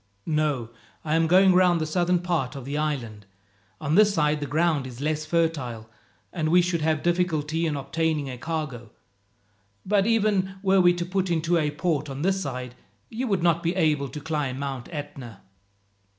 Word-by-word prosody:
"No, 150 -7 -1 0.3
I 155 - -1
am 165 0 +3
going 185 +2 +6
round 180 -2 +4
the 155 - -1
southern 175 +3 +1
part 160 -7 -1
of 135 -3 -7
the 140 +2 -4
island. 120 -9 -3 0.5
On 150 0 -2
this 210 +3 +6
side 150 -5 +1
the 145 - -4
ground 155 -3 +1
is 125 -1 -10
less 155 +1 -2
fertile, 140 -10 -1 0.5
and 155 -3 -1
we 175 +2 +5
should 175 -2 0
have 155 -1 0
difficulty 165 -2 0
in 150 - -1
obtaining 155 +1 -1
a 130 - -5
cargo. 145 -7 -4 1.0
But 200 0 +2
even 205 -4 +1
were 190 -1 +4
we 175 0 +5
to 175 0 -3
put 190 +1 -1
into 170 0 +1
a 150 -1 +1
port 150 -1 -1
on 135 +2 -5
this 190 +1 +1
side, 125 -5 -5 0.4
you 250 +3 -3
would 195 -6 0
not 170 -1 +3
be 170 +2 -1
able 150 -6 +1
to 150 - -7
climb 150 -4 -2
Mount 135 -3 -5
Etna. 140 - -8
155 Hz, 180 wpm, -25 LUFS, 140-175 Hz, 1.0 s, going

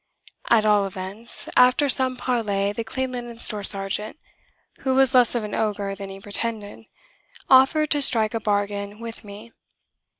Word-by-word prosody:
At 220 -2 +4
all 205 -2 +3
events, 195 +4 -5
after 255 +3 +4
some 260 -1 +2
parley, 205 -6 -1
the 230 - -4
Clean 260 +3 -4
Linen 240 -2 -7
Store 215 -2 -4
sergeant 200 +5 -1 0.6
(who 265 -1 -1
was 265 -1 +3
less 250 -2 +4
of 235 - -1
an 210 - -7
ogre 205 -2 -2
than 195 0 -8
he 195 0 -10
pretended) 210 +1 -4 0.7
offered 270 +4 +4
to 290 - +2
strike 225 -5 +5
a 225 - -2
bargain 205 0 -3
with 230 -1 -9
me. 210 +3 -12
220 Hz, 160 wpm, -23 LUFS, 205-250 Hz, 0.7 s, strike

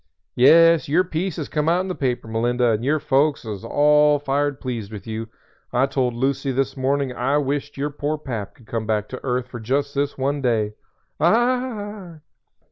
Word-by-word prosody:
"Yes, 165 +5 +6
your 170 +5 +4
piece 180 0 -3
has - - -4
come 150 +1 0
out 175 +2 +3
in 190 - -4
the 185 - -2
paper, 125 -7 -2
Melinda, 120 +2 +1
and 110 +1 -1
your 150 +4 +1
folks 145 -1 +1
are 110 -2 -4
all 150 +2 +4
fired 145 0 -1
pleased 115 -5 -5
with 105 -2 -8
you. 110 0 -5 0.4
I 125 +2 +3
told 130 -3 -1
Lucy 135 +2 0
this 135 +1 -1
morning 135 0 0
I 130 +4 0
wisht 145 0 -2
your 145 +2 -2
poor 150 +1 -2
Pap 115 -9 -6
could 120 - -20
come 110 -1 -4
back 105 -1 -1
to 130 - -8
earth 125 -1 -1
for 120 - -7
just 140 +5 -1
this 145 0 -1
one 140 +2 -1
day." 110 -5 0 0.5
"Ah 215 - 0
h!" 155 - -18
140 Hz, 195 wpm, -22 LUFS, 120-150 Hz, 0.5 s, Yes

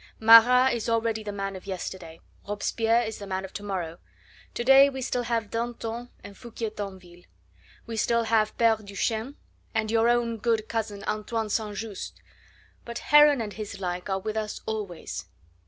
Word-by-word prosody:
Marat 240 +3 +7
is 235 -1 -2
already 225 -1 0
the 210 -1 -5
man 195 -1 -4
of 190 +1 -10
yesterday, 180 -3 -6 0.3
Robespierre 225 +3 +1
is 220 -1 -5
the 200 - -8
man 190 0 -3
of 190 - -12
to - - -6
morrow. 180 -5 -4 0.6
To 240 - -2
day 270 +2 +7
we 265 -1 -6
still 250 -1 -1
have 230 -3 -2
Danton 235 0 -4
and 200 0 -10
Foucquier 230 -1 -6
Tinville; 185 -4 -9 0.6
we 225 -1 -6
still 235 +1 +2
have 220 -1 +1
Pere 230 -1 +4
Duchesne, 220 +5 -3 0.4
and 220 -1 0
your 230 +1 +3
own 240 -1 +1
good 220 0 0
cousin 215 -3 -3
Antoine 215 0 -2
St. 210 -1 -1
Just, 215 -3 -6 0.6
but 235 0 -6
Heron 295 -3 +5
and 210 -2 -5
his 205 -2 -7
like 180 0 -4
are 190 - +1
with 215 +3 -4
us 215 -1 -3
always." 205 -6 -5
220 Hz, 170 wpm, -26 LUFS, 200-230 Hz, 0.6 s, Marat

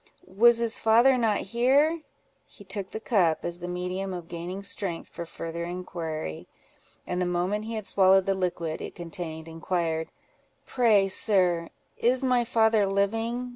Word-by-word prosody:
Was 235 +5 +5
his 230 -1 0
father 235 +4 +5
not 225 -4 +1
here?" 270 - +2 0.5
He 205 - -16
took 195 -1 -3
the 220 - -6
cup, 185 -8 +1
as 175 0 -3
the 175 - -6
medium 180 +2 -3
of 175 -2 -8
gaining 175 +3 -6
strength 185 -4 -4
for 170 - -7
farther 165 +1 -6
inquiry; 165 - -5 0.6
and 180 0 -2
the 180 - 0
moment 180 +5 -1
he 225 0 -5
had 215 -2 -5
swallowed 190 -1 +4
the 195 - +1
liquid 170 -4 -3
it - - -7
contained, 165 -2 -6
inquired—"Pray, 175 +6 -1
sir, 180 -4 +2 0.3
is 250 +3 +2
my 250 -2 +3
father 220 -3 +3
living? 225 +5 -1
190 Hz, 150 wpm, -27 LUFS, 175-225 Hz, 0.6 s, Was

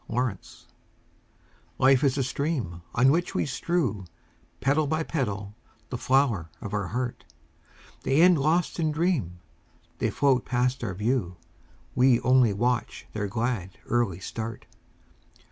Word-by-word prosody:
Petals 120 -5 -3 1.1
Life 135 +1 +4
is 140 -1 +2
a 135 - +1
stream 130 - -2
On 130 +2 +5
which 170 +3 0
we - - +1
strew 130 - -1 0.5
Petal 145 +3 +2
by 160 +2 0
petal 105 -11 -3 0.4
the 125 - -3
flower 125 - +2
of 105 -4 -7
our 100 -2 -1
heart; 120 +4 -3 0.8
The 135 +3 +1
end 180 -3 +6
lost 165 +5 +1
in 155 -2 +1
dream, 150 - 0 0.6
They - - +1
float 135 -3 +2
past 125 0 0
our 95 -5 -3
view, 105 -4 -1 0.6
We 125 -1 +4
only 125 -3 +4
watch 120 +4 -1
their 105 -1 -2
glad, 110 -3 -2
early 115 -7 0
start. 110 +3 -6
125 Hz, 130 wpm, -27 LUFS, 105-140 Hz, 1.1 s, end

